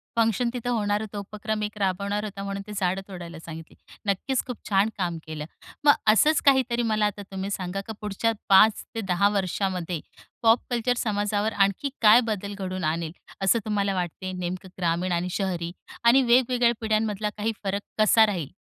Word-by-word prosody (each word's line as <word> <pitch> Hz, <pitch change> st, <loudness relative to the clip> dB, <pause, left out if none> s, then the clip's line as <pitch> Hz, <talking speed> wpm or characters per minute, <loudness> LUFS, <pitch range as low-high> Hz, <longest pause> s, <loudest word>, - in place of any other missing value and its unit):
Function 230 Hz, +1 st, +2 dB
तिथं 245 Hz, -1 st, -3 dB
होणार 210 Hz, -3 st, 0 dB
होतं, 215 Hz, -1 st, -6 dB
उपक्रम 210 Hz, +1 st, -4 dB
एक 210 Hz, 0 st, -4 dB
राबवणार 200 Hz, +1 st, -1 dB
होता, 200 Hz, -2 st, -6 dB
म्हणून 200 Hz, 0 st, -4 dB
ते -, -, -8 dB
झाडं 190 Hz, -1 st, 0 dB
तोडायला 175 Hz, -4 st, -8 dB
सांगितली. 160 Hz, -1 st, -10 dB, 0.3 s
नक्कीच, 205 Hz, +6 st, 0 dB
खूप 250 Hz, -3 st, -5 dB
छान 200 Hz, +1 st, +3 dB
काम 175 Hz, -3 st, -1 dB
केलं. 155 Hz, -1 st, -5 dB, 0.4 s
मग 290 Hz, -, +8 dB
असंच 225 Hz, +9 st, +5 dB
काहीतरी 260 Hz, -3 st, +4 dB
मला 215 Hz, -1 st, +2 dB
आता 205 Hz, 0 st, -2 dB
तुम्ही 195 Hz, +1 st, -4 dB
सांगा, 190 Hz, 0 st, -3 dB
का 220 Hz, -, -4 dB
पुढच्या 210 Hz, +2 st, 0 dB, 0.2 s
5 205 Hz, +3 st, +6 dB
ते 225 Hz, -, -6 dB
10 195 Hz, 0 st, +2 dB
वर्षामध्ये 185 Hz, -3 st, -1 dB, 0.4 s
पॉप 230 Hz, +1 st, +5 dB
कल्चर 245 Hz, 0 st, +1 dB
समाजावर 205 Hz, -1 st, 0 dB
आणखी 200 Hz, +7 st, +1 dB
काय 220 Hz, +1 st, +8 dB
बदल 205 Hz, -1 st, -3 dB
घडवून 185 Hz, -1 st, -4 dB
आणेल, 160 Hz, +1 st, -1 dB, 0.3 s
असं 195 Hz, +4 st, +3 dB
तुम्हाला 200 Hz, -2 st, 0 dB
वाटते? 185 Hz, +1 st, -3 dB
नेमकं, 185 Hz, +1 st, -5 dB
ग्रामीण 175 Hz, +1 st, 0 dB
आणि 175 Hz, +1 st, 0 dB
शहरी 175 Hz, -3 st, -2 dB, 0.3 s
आणि 235 Hz, +3 st, +6 dB
वेगवेगळ्या 245 Hz, -1 st, +4 dB
पिढ्यांमधला 215 Hz, -1 st, 0 dB
काही 215 Hz, +2 st, 0 dB
फरक 200 Hz, 0 st, -1 dB, 0.2 s
कसा 220 Hz, +1 st, +6 dB
राहील? 180 Hz, -9 st, -3 dB
205 Hz, 170 wpm, -25 LUFS, 185-220 Hz, 0.4 s, मग